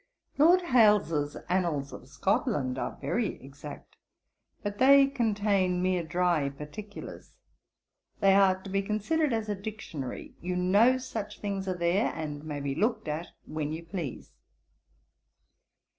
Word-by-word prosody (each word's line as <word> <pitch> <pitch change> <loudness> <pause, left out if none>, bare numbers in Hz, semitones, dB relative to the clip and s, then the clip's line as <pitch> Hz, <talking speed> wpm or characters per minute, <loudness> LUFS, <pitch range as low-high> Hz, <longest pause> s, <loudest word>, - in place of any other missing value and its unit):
Lord 350 +5 +6
Hailes's 210 - +3
Annals 170 -6 0
of - - -10
Scotland 130 -2 0
are - - -4
very 230 -4 -1
exact; 145 +2 -11 0.7
but 205 -1 -4
they 275 +1 +7
contain 205 -8 +1
mere 185 -1 +1
dry 170 -3 +1
particulars. 150 +9 -9 0.8
They 195 -1 +5
are 190 -1 +4
to 195 - -8
be 195 0 +1
considered 220 +10 0
as 225 -2 -1
a 210 - 0
Dictionary. 195 - -6
You 180 +1 -2
know 200 +8 +4
such 225 -5 -6
things 195 -2 -3
are 185 -1 -1
there; 175 +4 +1
and 150 -2 -5
may 150 -2 -5
be 140 -1 -2
looked 215 - 0
at 155 +3 -3 0.2
when 155 -1 -3
you 165 +1 -6
please. 165 -7 -6
185 Hz, 135 wpm, -29 LUFS, 155-215 Hz, 0.8 s, they